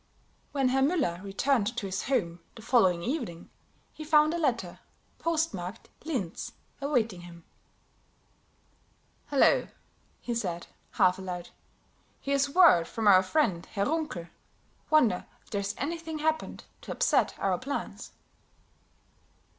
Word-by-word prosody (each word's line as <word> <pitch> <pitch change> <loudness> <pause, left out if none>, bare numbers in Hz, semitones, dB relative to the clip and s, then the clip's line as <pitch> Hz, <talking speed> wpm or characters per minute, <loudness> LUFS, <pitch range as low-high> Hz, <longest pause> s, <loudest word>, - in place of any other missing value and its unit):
When 270 -3 +1
Herr 265 +1 +2
Müller 270 - +1
returned 225 +3 0
to 210 - -2
his 190 0 -3
home 180 -11 0 0.2
the 225 - -11
following 185 -9 +3
evening, 235 - -4 0.4
he 310 - -8
found 305 0 +4
a 340 - -1
letter, 235 - -1 0.4
postmarked 235 - -2 0.2
"Linz," 240 - -3 0.3
awaiting 230 -10 0
him. 170 -1 -12 1.8
"Hello," 295 - +4 0.5
he 240 - -4
said, 180 -7 -3 0.3
half 180 0 +3
aloud, 180 -2 -6 0.7
"here's 280 0 +1
word 290 - +6
from 225 -2 -2
our 185 -2 +8
friend 190 - +1
Herr 200 -1 -1
Runkel. 305 - -2 0.6
Wonder 245 -12 +3 0.2
if - - -25
there's 200 0 -2
anything 325 +2 -4
happened 315 +1 -1 0.2
to - - -8
upset - - +2
our 190 -2 0
plans?" 280 +2 -5
235 Hz, 120 wpm, -29 LUFS, 185-300 Hz, 1.8 s, our